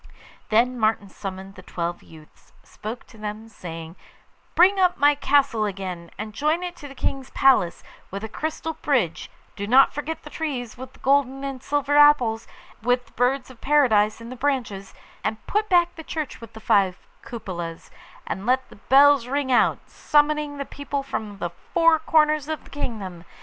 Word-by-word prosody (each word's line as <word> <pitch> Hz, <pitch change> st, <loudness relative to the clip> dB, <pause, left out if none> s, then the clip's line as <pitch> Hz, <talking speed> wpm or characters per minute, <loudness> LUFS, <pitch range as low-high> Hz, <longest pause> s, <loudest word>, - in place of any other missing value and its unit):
Then 245 Hz, +3 st, +2 dB
Martin 215 Hz, -2 st, +1 dB
summoned 190 Hz, 0 st, -7 dB
the 185 Hz, -, -12 dB
twelve 175 Hz, -1 st, -4 dB
youths, 155 Hz, -1 st, -18 dB
spoke 220 Hz, +3 st, -8 dB
to 225 Hz, -, -17 dB
them, 215 Hz, +1 st, -6 dB
saying, 165 Hz, -5 st, -8 dB, 0.6 s
'Build 385 Hz, +3 st, +5 dB
up 365 Hz, -1 st, +3 dB
my 290 Hz, +1 st, +5 dB
castle 280 Hz, -6 st, +2 dB
again, 185 Hz, -4 st, -5 dB
and 215 Hz, 0 st, -6 dB
join 305 Hz, +8 st, 0 dB
it 355 Hz, -1 st, -5 dB
to 290 Hz, -, -9 dB
the 275 Hz, -, -12 dB
King's 270 Hz, 0 st, -3 dB
Palace 260 Hz, -11 st, +3 dB, 0.3 s
with 200 Hz, +2 st, -6 dB
a -, -, -3 dB
crystal 315 Hz, +6 st, -4 dB
bridge; 250 Hz, -, -1 dB, 0.3 s
do 200 Hz, -, -4 dB
not 260 Hz, +4 st, +6 dB
forget 300 Hz, +2 st, -5 dB
the -, -, -11 dB
trees 265 Hz, -8 st, -4 dB
with 260 Hz, +2 st, -10 dB
the -, -, -20 dB
golden 270 Hz, 0 st, +2 dB
and 270 Hz, -2 st, -5 dB
silver 290 Hz, +1 st, 0 dB
apples, 250 Hz, -7 st, +5 dB, 0.3 s
and 225 Hz, -, -14 dB
with 245 Hz, 0 st, +2 dB
the -, -, -23 dB
birds 255 Hz, +1 st, 0 dB
of 245 Hz, -, -17 dB
Paradise 230 Hz, -8 st, +3 dB
in 230 Hz, +1 st, -9 dB
the -, -, -6 dB
branches; 240 Hz, -8 st, -2 dB, 0.3 s
and 220 Hz, -, -3 dB
put 425 Hz, +1 st, 0 dB
back 350 Hz, -2 st, +4 dB
the 325 Hz, -, -9 dB
church 310 Hz, -5 st, -5 dB
with 230 Hz, -, -11 dB
the 220 Hz, -, -10 dB
five 195 Hz, -4 st, +2 dB, 0.2 s
cupolas, 175 Hz, -7 st, -7 dB, 0.3 s
and 195 Hz, +4 st, -5 dB
let 260 Hz, +1 st, +1 dB
the -, -, -15 dB
bells 275 Hz, +2 st, +5 dB
ring 275 Hz, 0 st, -1 dB
out, 245 Hz, -, +2 dB
summoning 295 Hz, 0 st, +1 dB
the 280 Hz, -, -4 dB
people 285 Hz, 0 st, -4 dB
from 215 Hz, -7 st, -5 dB
the 175 Hz, -3 st, -3 dB, 0.2 s
four 330 Hz, -2 st, +5 dB
corners 305 Hz, -2 st, +2 dB
of 315 Hz, -1 st, -4 dB
the -, -, -18 dB
kingdom. 200 Hz, -11 st, -5 dB
255 Hz, 180 wpm, -24 LUFS, 210-290 Hz, 0.6 s, not